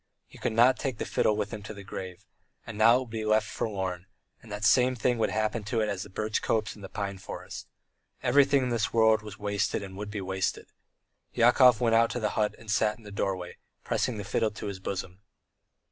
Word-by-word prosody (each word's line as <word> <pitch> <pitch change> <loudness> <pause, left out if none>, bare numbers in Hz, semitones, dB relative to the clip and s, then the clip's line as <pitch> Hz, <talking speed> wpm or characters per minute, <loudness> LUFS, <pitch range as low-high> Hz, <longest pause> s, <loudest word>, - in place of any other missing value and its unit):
He - - -16
could - - -1
not 120 +3 +5
take 135 -5 -2
the - - -3
fiddle 105 - +1
with 105 +1 -3
him 105 - -5
to 105 +1 -8
the 100 - -9
grave, 95 -2 -8 0.4
and 115 - -7
now 110 +3 +6
it - - +3
would 125 - -8
be 110 -1 -3
left 110 0 +2
forlorn, 95 -4 -3 0.3
and 110 - -14
the 105 - -4
same 125 +4 +4
thing 120 0 0
would - - +2
happen 110 +1 -1
to 115 +2 -1
it 110 -1 +1
as 95 -2 -3
to - - -6
the - - -19
birch 110 0 -1
copse 110 -2 0
and 105 - -14
the 95 - -7
pine 100 -2 -4
forest. - - -8 0.6
Everything 140 +1 +4
in 125 - -1
this 115 -2 0
world 110 -1 +4
was 105 -1 -9
wasted 100 -1 -1
and 95 -1 -8
would 105 +1 -6
be 105 0 -4
wasted! 95 0 -3 0.6
Yakov 125 0 +6
went 115 -2 +3
out 115 +1 +3
of 120 - -3
the 105 - +2
hut 105 -1 0
and 110 -2 -7
sat 105 +2 +2
in 115 - -18
the 105 - -10
doorway, 95 -3 -3 0.3
pressing 120 - -1
the 105 - -4
fiddle 105 +2 0
to 105 0 -8
his 100 -2 -5
bosom. 95 -1 -5
110 Hz, 235 wpm, -28 LUFS, 100-115 Hz, 0.6 s, now